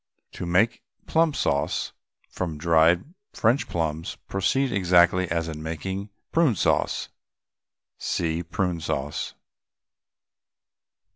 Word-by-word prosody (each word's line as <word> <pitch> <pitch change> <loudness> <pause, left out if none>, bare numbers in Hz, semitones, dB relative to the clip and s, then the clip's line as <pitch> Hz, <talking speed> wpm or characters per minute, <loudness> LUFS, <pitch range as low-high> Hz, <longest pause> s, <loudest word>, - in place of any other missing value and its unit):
To 90 - -6
make 95 +7 +2 0.2
plum 165 0 +3
sauce 70 0 0 0.3
from 85 -4 -4
dried 85 - +3 0.2
French 120 +5 +2
plums 80 -1 -2
proceed 130 +7 +1
exactly 90 -2 +4
as 85 -1 -1
in 80 -1 -6
making 95 +6 -4 0.2
Prune 160 -9 +3
Sauce. - - +1 0.9
(See 80 -1 -1
PRUNE 85 0 -2
SAUCE.) 75 -2 -3
85 Hz, 95 wpm, -25 LUFS, 80-100 Hz, 0.9 s, exactly